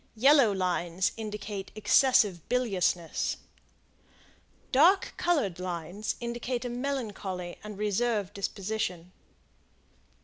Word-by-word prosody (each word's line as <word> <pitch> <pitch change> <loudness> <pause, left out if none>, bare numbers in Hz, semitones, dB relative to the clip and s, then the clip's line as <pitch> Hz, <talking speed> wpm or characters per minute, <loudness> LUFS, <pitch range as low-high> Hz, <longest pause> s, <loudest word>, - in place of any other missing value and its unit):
Yellow 265 0 +6
lines 180 -1 0
indicate 210 -2 -5
excessive 215 - +3
biliousness. 190 -9 0 1.3
Dark 340 +9 +4
colored 280 - 0
lines 180 +3 -4
indicate 240 +1 -3
a - - -2
melancholy 215 -9 -4
and 210 -1 -8
reserved 210 -1 0
disposition. 195 -3 -3
210 Hz, 80 wpm, -29 LUFS, 185-240 Hz, 1.3 s, Yellow